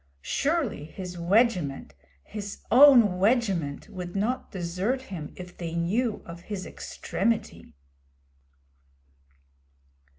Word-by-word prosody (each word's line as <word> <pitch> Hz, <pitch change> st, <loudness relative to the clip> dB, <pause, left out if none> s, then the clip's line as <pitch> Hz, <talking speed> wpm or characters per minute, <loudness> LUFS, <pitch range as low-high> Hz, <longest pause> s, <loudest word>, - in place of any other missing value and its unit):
Surely 280 Hz, -, 0 dB
his 180 Hz, +3 st, -8 dB
'wegiment,' 175 Hz, -, +1 dB, 0.3 s
his 205 Hz, -2 st, -7 dB
own 240 Hz, -8 st, +7 dB
'wegiment,' 195 Hz, -, +1 dB
would 180 Hz, 0 st, -7 dB
not 225 Hz, +6 st, -1 dB
desert 185 Hz, +8 st, -1 dB
him 155 Hz, -4 st, -6 dB
if 180 Hz, -1 st, -9 dB
they 170 Hz, -1 st, -5 dB
knew 210 Hz, +8 st, 0 dB
of 170 Hz, 0 st, -9 dB
his 195 Hz, 0 st, -5 dB
extremity. 170 Hz, -, -3 dB
190 Hz, 95 wpm, -27 LUFS, 170-230 Hz, 0.3 s, own